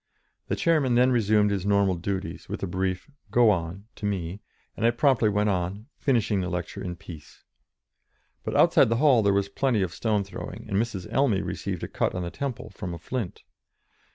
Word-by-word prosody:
The - - 0
chairman 150 -7 +2
then 125 +2 +5
resumed 105 -3 +3
his 100 -3 -1
normal 100 -1 +3
duties, 95 0 -4
with - - -5
a - - +2
brief 95 0 -2 0.2
"Go 115 +1 +5
on" 90 +2 -3
to 105 - -2
me, 95 -1 -3 0.4
and - - -5
I 115 - +6
promptly 120 -2 +3
went 105 +1 +1
on, 100 +5 -2
finishing 115 -7 +1
the 90 - -2
lecture 90 -3 -4
in 90 -2 -4
peace. 80 -4 -12 1.0
But - - -3
outside - - +5
the 115 - +2
hall 130 -2 +5
there 100 -1 +3
was 100 0 +1
plenty 115 -1 +1
of 90 -2 -3
stone 105 -3 0
throwing, 100 - -8
and - - -3
Mrs. 105 -5 -1
Elmy 120 -8 +2
received 95 -4 -4
a - - -2
cut - - -1
on 90 - -2
the 85 - -4
temple 130 +2 -5
from 90 -3 -6
a - - -7
flint. 110 +2 -5
100 Hz, 195 wpm, -26 LUFS, 95-115 Hz, 1.0 s, I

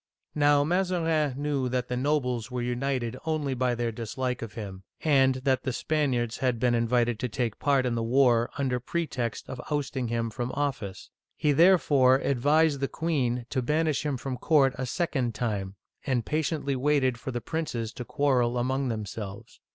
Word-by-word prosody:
Now 145 -1 +4
Mazarin 165 -4 +1
knew 140 -3 -1
that 125 -1 -1
the 125 - -2
nobles 125 -4 0
were 125 -1 -3
united 125 0 -2
only 155 -4 -1
by 125 -1 0
their 120 -1 -1
dislike 125 +3 -3
of 115 -2 -6
him, 95 -4 -7 0.2
and 135 -4 +4
that 130 -1 +2
the 130 - -2
Spaniards 125 -5 0
had 125 -3 0
been 125 +1 +2
in 115 0 +1
vited 120 -1 +1
to 125 - -2
take 115 -1 -2
part 140 -3 +2
in 125 - 0
the 115 - -1
war 120 0 +3
under 130 -3 0
pretext 125 -4 -3
of 125 - -6
ousting 140 -4 -1
him 115 0 -1
from 120 +2 -3
office. 135 -10 -3 0.3
He 150 - +2
therefore 145 -5 +5
advised 145 +3 +2
the 135 - 0
queen 130 -8 -1
to 130 - 0
banish 155 +3 +1
him 145 -3 -1
from 130 0 -4
court 135 -1 +3
a 130 0 -3
second 130 - -1
time, 100 -4 -2 0.3
and 125 -4 0
patiently 150 -2 -1
waited 130 -2 +1
for 130 - -6
the 120 -2 -2
princes 120 -5 -3
to 125 - -6
quarrel 125 -3 +1
among 130 +2 0
themselves. 110 -1 -6
130 Hz, 175 wpm, -27 LUFS, 120-145 Hz, 0.3 s, therefore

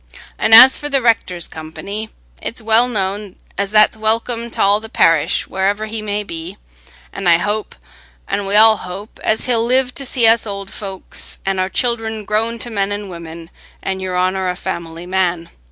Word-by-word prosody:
An' - - +1
as 255 +4 +10
for 295 - -5
the 275 -1 +2
rector's 220 -8 0
company, 200 +7 -7 0.3
it's 235 - -3
well 225 +2 +3
known 200 -3 -3 0.2
as 200 0 -2
that's 215 +1 +4
welcome 230 +2 -1
t' - - -5
all 200 +1 +4
the 220 +1 -10
parish 165 -7 +2
wherever 200 +3 -1
he 220 0 -5
may 210 0 -3
be; 170 +1 -7 0.6
an' 195 -2 -3
I 170 -1 +6
hope, 210 +4 -2 0.5
an' 200 0 -2
we 200 - +1
all 220 0 +7
hope, 190 +4 -9
as 220 - 0
he'll 235 -3 +1
live 250 +1 +1
to 275 - -4
see 255 -3 0
us 225 0 +4
old 200 -1 -6
folks, 195 -2 -5
an' 195 -1 -1
our 185 0 0
children 225 -1 -1
grown 225 +3 -1
to 240 - -8
men 200 -2 -1
an' 205 -1 -5
women 170 -1 -10 0.3
an' 190 0 -2
Your 185 -1 -3
Honour 185 +1 0
a 180 - -2
family 170 -1 -6
man. 180 -2 -1
205 Hz, 185 wpm, -17 LUFS, 185-225 Hz, 0.6 s, as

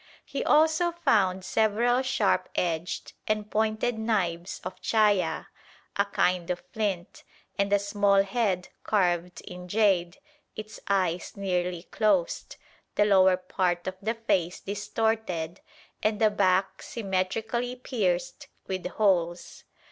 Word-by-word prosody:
He - - -3
also 315 +3 +4
found 190 - +2
several 230 +3 +2
sharp 250 -6 +1
edged 170 -1 -2
and 215 0 -1
pointed 220 +2 0
knives 185 -6 -1
of 185 0 -7
chaya, 200 -7 +2 0.5
a 200 - +2
kind 180 -3 0
of 180 -1 -2
flint, 195 -5 -3 0.3
and 200 0 0
a 205 - +6
small 200 -1 +3
head 195 -3 -1
carved 180 -3 0
in 180 0 -9
jade, 190 -3 +2 0.4
its 215 0 -8
eyes 185 -3 0
nearly 180 -3 -1
closed, 200 -4 0 0.4
the 210 - +4
lower 190 -2 +5
part 180 -1 -1
of 185 - -2
the 220 +3 -1
face 185 -6 0
distorted, 205 -4 -2 0.4
and 215 -1 +1
the 215 -1 +4
back 190 -1 +1
symmetrically 220 +4 -2
pierced 195 -9 -2 0.2
with 185 -1 -3
holes. 175 -4 0
195 Hz, 120 wpm, -27 LUFS, 180-215 Hz, 0.5 s, a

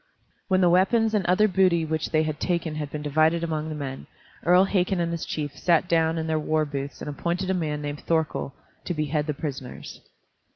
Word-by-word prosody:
When 185 -1 +3
the 180 - +5
weapons 220 +5 +3
and 210 -3 +2
other 185 +4 +4
booty 185 -4 +3
which 155 0 -2
they 155 -1 +2
had 155 -1 -3
taken 170 -3 -1
had 150 -2 -4
been 150 +1 -5
divided 155 +3 +2
among 160 -1 -2
the 155 - -4
men, 135 -2 -6 0.4
Earl 180 +2 +6
Hakon 190 -1 +1
and 170 -1 0
his 170 -1 -3
chiefs 145 -2 -4
sat 170 0 +3
down 165 -1 +2
in 160 - -2
their 160 -1 0
warbooths 150 -3 -2
and - - -6
appointed 175 +6 -2
a - - +2
man 150 -4 -2
named 145 0 -4
Thorkel 160 -4 0 0.3
to 175 - -2
behead 150 0 -1
the 150 - -1
prisoners. 135 -4 -7
160 Hz, 205 wpm, -25 LUFS, 150-175 Hz, 0.4 s, Earl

